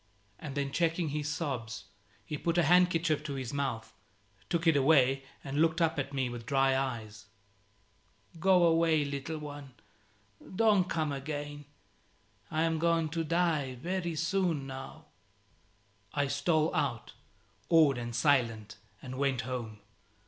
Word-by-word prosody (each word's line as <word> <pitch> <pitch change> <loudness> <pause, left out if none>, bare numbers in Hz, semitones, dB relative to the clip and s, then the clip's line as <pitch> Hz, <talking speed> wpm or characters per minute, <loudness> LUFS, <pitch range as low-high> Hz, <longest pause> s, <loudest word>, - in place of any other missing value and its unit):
And 145 -3 -7
then 140 -1 -1
checking 165 +1 0
his 150 0 -2
sobs, 130 -8 -4 0.4
he 150 - -4
put 170 +3 -1
a 175 - +4
handkerchief 165 -2 +3
to 140 -2 -4
his 130 -2 -5
mouth, 135 -6 -3 0.6
took 170 0 0
it 165 -2 +5
away, 135 -2 +4 0.2
and 140 +2 -1
looked 165 +1 +2
up 165 -2 +1
at 135 0 -3
me 135 -2 -1
with 120 -1 -7
dry 135 0 +3
eyes. 110 -6 -4 1.1
"Go 185 0 +4
away, 165 -2 +3
little 140 +3 -4
one, 145 -3 -9 0.8
Don't 205 -4 +3
come 155 -3 -1
again: 145 +1 -5 0.8
I 160 0 0
am 165 -1 0
going 165 -1 +2
to 165 +1 -2
die 160 -5 0
very 175 +4 -3
soon 170 -3 0
now." 135 0 -8 1.1
I 145 -1 +2
stole 150 +3 +1
out, - - -2 0.6
awed 155 -6 +5
and 120 -1 -5
silent, 115 -7 +1 0.3
and 130 0 -6
went 135 -3 +1
home. 115 -4 -5
145 Hz, 140 wpm, -31 LUFS, 135-165 Hz, 1.1 s, it